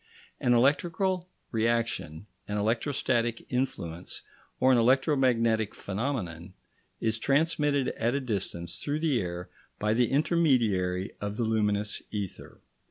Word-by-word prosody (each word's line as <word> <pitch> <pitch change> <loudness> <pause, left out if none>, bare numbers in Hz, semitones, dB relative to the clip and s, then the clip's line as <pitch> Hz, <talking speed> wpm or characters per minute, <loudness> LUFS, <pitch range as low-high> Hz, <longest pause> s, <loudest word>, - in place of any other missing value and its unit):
An 120 -1 +3
electric 145 +7 +3 0.6
reaction, 115 -7 -1 0.2
an 105 - -2
electrostatic 115 +1 0
influence, 90 -10 -3 0.4
or 130 +1 +5
an 125 - +5
electromagnetic 120 -4 +3
phenomenon, 95 - -4 0.4
is 110 0 0
transmitted 145 0 +2
at 115 +3 -1
a - - +1
distance 95 -8 -3
through 145 +1 -1
the 145 -8 +2
air 90 -1 -5 0.3
by 105 +1 +1
the 120 +1 +2
intermediary 115 - +2
of 105 +1 -3
the 120 - 0
luminous 105 -2 0
ether. 100 -3 -6
115 Hz, 115 wpm, -28 LUFS, 100-130 Hz, 0.6 s, or